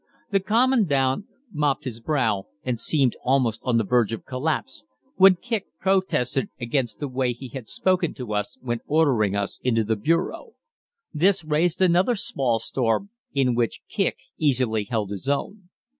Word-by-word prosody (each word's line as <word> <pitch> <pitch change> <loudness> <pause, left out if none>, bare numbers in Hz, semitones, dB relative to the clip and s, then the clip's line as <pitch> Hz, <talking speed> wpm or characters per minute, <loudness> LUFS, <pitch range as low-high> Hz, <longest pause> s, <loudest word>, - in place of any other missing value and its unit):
The 195 - +3
Commandant 200 - +2 0.3
mopped 150 -2 0
his 120 -4 -6
brow 115 -7 0 0.2
and 125 -3 -2
seemed 135 -1 +2
almost 125 -4 +2
on 125 -3 +1
the 115 - +2
verge 115 +1 +2
of 115 - -5
collapse, 145 - -3 0.3
when 190 0 +8
Kicq 225 +1 -3
protested 185 -10 +1
against 120 -2 -1
the 145 - -3
way 130 -1 -1
he 125 +2 -10
had 120 -2 -8
spoken 180 - +1
to 120 -5 -5
us 105 -1 -2
when 120 -2 -2
ordering 130 -10 +2
us 100 0 -2
into 115 -3 +2
the 110 +1 0
bureau. 165 - -1 0.6
This 175 +3 +3
raised 165 +4 +1
another 185 +7 +3
small 130 - 0
storm, 120 - -1 0.2
in 130 -3 +3
which 120 -1 -1
Kicq - - 0 0.2
easily 125 -8 +1
held 105 -2 -2
his 100 +7 -4
own. 180 +7 -3
130 Hz, 160 wpm, -24 LUFS, 115-170 Hz, 0.6 s, when